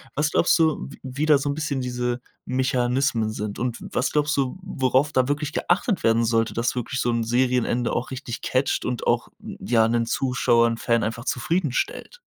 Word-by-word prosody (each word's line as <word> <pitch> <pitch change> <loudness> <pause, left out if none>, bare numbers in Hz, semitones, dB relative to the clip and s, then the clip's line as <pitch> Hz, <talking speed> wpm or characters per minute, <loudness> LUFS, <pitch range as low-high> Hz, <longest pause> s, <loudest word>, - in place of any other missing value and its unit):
was 150 +1 +1
glaubst 175 - +3
du, 160 -2 +1
w 140 - -12
wie 135 +3 -2
da 150 -2 +6
so 145 - -2
'n - - 0
bisschen 150 -3 -2
diese 125 -1 -2 0.2
Mechanismen 125 -2 +1
sind 105 -1 -5
und 120 -1 -2
w - - -7
was - - 0
glaubst 150 +1 +1
du, 135 +3 -1
worauf 135 -4 +1
da 130 -4 +2
wirklich 145 +1 -2
geachtet 195 +3 0
werden 115 +1 +3
sollte, 115 -1 +1
dass 115 +1 0
wirklich 125 +2 -3
so 120 - 0
'n 115 -1 0
Serienende 125 0 +1
auch - - -2
richtig 130 -3 -6
catcht 130 +2 0
und 125 -3 -3
auch - - +1
ja 115 -2 0
'nen 115 0 0
Zuschauer, 120 -2 +2
'n 115 0 -2
Fan 115 0 +1
einfach 115 +2 -3
zufriedenstellt? 165 - -2
125 Hz, 195 wpm, -24 LUFS, 115-140 Hz, 0.2 s, da